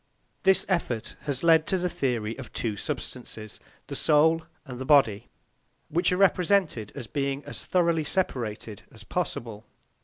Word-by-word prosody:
This 190 -1 +4
effort 145 - -1
has 140 -2 -1
led 165 -1 +5
to 190 - +2
the 180 0 0
theory 120 -9 -1
of 135 - -9
two 110 -3 -2
substances, 110 +1 -6 0.3
the - - -6
soul 160 +2 +4 0.2
and 125 -3 -8
the - - -3
body, 130 -8 +3 0.6
which 175 +3 +2
are 180 - +1
represented 180 - +2
as 140 -4 -6
being 140 +4 -2
as - - -7
thoroughly 170 -3 +2
separated 115 - -2
as - - -11
possible. 110 -3 -4
145 Hz, 150 wpm, -27 LUFS, 115-170 Hz, 0.6 s, led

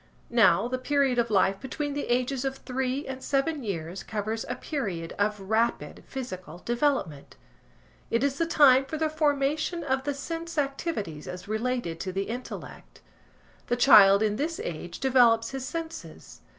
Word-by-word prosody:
Now, 230 -2 +4
the 255 +1 -3
period 270 -2 +1
of 235 -1 +1
life 195 -1 +2
between 290 +2 -4
the 285 - -3
ages 250 +2 0
of 270 -1 -2
three 265 +2 -3
and 265 0 -6
seven 280 +2 0
years 175 -3 -4
covers 215 +1 -3
a - - -2
period 195 - -4
of 210 +1 +1
rapid 220 +4 -1
physical 185 - -7
development. 240 - -1 0.7
It 230 +3 +1
is 280 0 0
the 330 - +1
time 275 -5 +6
for 310 +3 -5
the 315 0 0
formation 305 +2 0
of 265 -2 0
the 285 0 -2
sense 330 +4 -6
activities 275 - -3
as 180 +1 -7
related 220 -6 -2
to 185 - -3
the 195 +1 -1
intellect. 245 +5 -8 0.7
The 240 - 0
child 205 -5 +7
in 210 -1 0
this 320 +4 -2
age 170 +1 -6
develops 240 -3 +4
his 265 -1 -5
senses. 330 +2 -7
255 Hz, 160 wpm, -27 LUFS, 210-280 Hz, 0.7 s, child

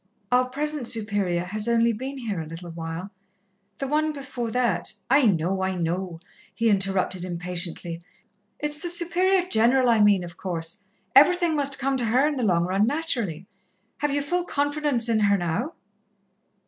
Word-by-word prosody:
"Our 250 0 +3
present 295 -1 -2
Superior 205 -6 -1
has 210 +4 -2
only 235 0 +3
been 265 +5 -6
here 215 -9 -3
a - - -6
little 165 +2 -8
while 165 +3 -6 0.7
the 275 - -3
one 305 +2 +1
before 260 -4 -5
that 220 -7 0
" - - -13
"I 250 - +4
know, 190 0 +1
I 190 0 -1
know," 175 0 -3 0.4
he 230 -1 +2
interrupted 190 -2 0
impatiently. 175 -1 -4 0.6
"It's 295 0 -2
the 345 - -3
Superior 360 +2 +2
General 245 -1 +3
I 230 -2 +4
mean, 205 -3 +4
of 170 -1 -10
course 175 +1 -4 0.3
everything 345 +3 +5
must 280 -2 +2
come 270 0 0
to 245 - -1
her 250 +5 +3
in 300 - -1
the 260 - -2
long 175 -6 +2
run, 195 +4 +1
naturally. 235 - -2 0.5
Have 295 - 0
you 285 0 -1
full 350 +4 -1
confidence 290 -5 +2
in 225 -2 +2
her, 200 -1 +3
now?" 195 - -2
230 Hz, 170 wpm, -25 LUFS, 180-280 Hz, 0.7 s, everything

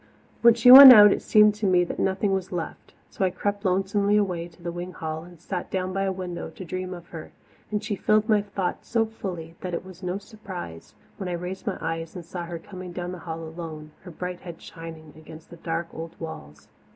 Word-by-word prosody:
When 235 -1 +7
she 235 +1 +6
went 270 0 +13
out 210 -4 +9
it - - -4
seemed 210 -1 +5
to 210 -1 -2
me 180 -1 +4
that 175 - -6
nothing 195 +1 0
was 190 -1 -3
left, 175 -3 -6 0.2
so - - -3
I 190 - +3
crept 200 +3 -3
lonesomely 200 +2 +1
away 180 -5 -1
to 170 0 -20
the 170 - -3
wing 175 +1 -7
hall 160 -1 -5
and 175 -1 -15
sat 180 +2 -5
down 185 0 -2
by 195 0 -1
a 190 - 0
window 180 -2 -6
to 195 -6 -10
dream 185 +2 -5
of 175 -1 -13
her; 165 -2 -9 0.4
and 210 -1 -2
she 210 -1 -2
filled 215 +2 +2
my 215 -2 +3
thoughts 200 -3 -4
so 225 -2 +2
fully 180 -7 -7
that 180 -2 -4
it 170 - -6
was 185 -1 -13
no 180 0 -3
surprise 195 - -10 0.2
when 190 -2 -5
I - - -3
raised 180 +5 -6
my 200 - -1
eyes 165 +1 -4
and 175 -2 -8
saw 175 +1 -6
her 170 0 -6
coming 180 +1 -10
down 175 0 -5
the 180 - -7
hall 165 -1 -6
alone, 160 -2 -8
her 185 - -11
bright 180 +2 -6
head 170 -2 -10
shining 160 -2 -11
against 160 0 -14
the 170 - -11
dark 165 +1 -4
old 165 +1 -8
walls. 75 - -9
180 Hz, 230 wpm, -25 LUFS, 165-200 Hz, 0.4 s, went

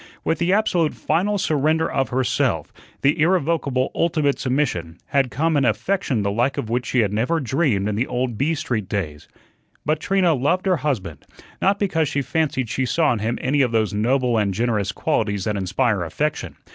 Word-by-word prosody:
With 165 - 0
the 170 +1 +1
absolute 180 -6 +2
final 190 +7 0
surrender 160 -1 +1
of 135 -3 -1
herself, 130 +1 0 0.3
the 140 +2 +3
irrevocable, 155 -6 +1
ultimate 155 -4 +1
submission, 125 - -1
had 135 -2 +2
come 160 +5 0
an 140 - +3
affection 130 - 0
the 100 - 0
like 120 +6 0
of 110 - -3
which 120 0 -1
she 125 - +2
had 105 -2 0
never 125 +10 +1
dreamed 130 - 0
in 105 - -1
the 120 +5 0
old 125 -1 -2
B 150 +9 0
Street 110 -9 -3
days. 80 -9 -4 0.6
But 155 0 +1
Trina 185 -1 +2
loved 150 +8 0
her 185 -2 +3
husband, 115 - -3 0.4
not 195 +1 +3
because 170 -7 0
she 140 - -1
fancied 140 -5 -1
she 130 +3 -1
saw 155 -1 +2
in 115 - -3
him 115 +3 -1
any 140 +2 +1
of 125 -3 +2
those 110 -2 +1
noble 120 +2 +1
and 100 -3 0
generous 105 -3 0
qualities 105 0 -1
that 105 +1 -1
inspire 100 +2 0
affection. 150 - -2
130 Hz, 185 wpm, -22 LUFS, 110-160 Hz, 0.6 s, the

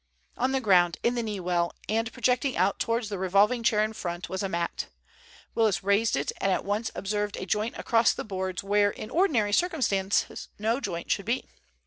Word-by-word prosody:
On 255 +2 0
the 265 - +1
ground 180 -6 +4
in 240 - +2
the 240 - -1
knee 210 -3 -3
well, 175 -1 0
and 225 +2 0
projecting 255 +2 0
out 190 +2 +2
towards 230 0 0
the 200 -3 -4
revolving 200 +6 +3
chair 215 -2 +3
in 215 +1 -2
front, 175 -4 -5
was 190 - -3
a 195 - -2
mat. 170 -1 -2 0.7
Willis 215 -4 +2
raised 200 +3 +2
it, 140 - -1
and 195 - +2
at - - 0
once 210 +3 -1
observed 205 +1 -2
a - - -4
joint 215 +4 -1
across 230 0 +3
the - - -5
boards 190 -2 -3
where 205 +1 +3
in 215 +2 -8
ordinary 260 - +2
circumstances 210 - +1
no 225 +4 0
joint 170 -7 -4
should 200 - 0
be. 245 +3 0
210 Hz, 195 wpm, -27 LUFS, 190-230 Hz, 0.7 s, ground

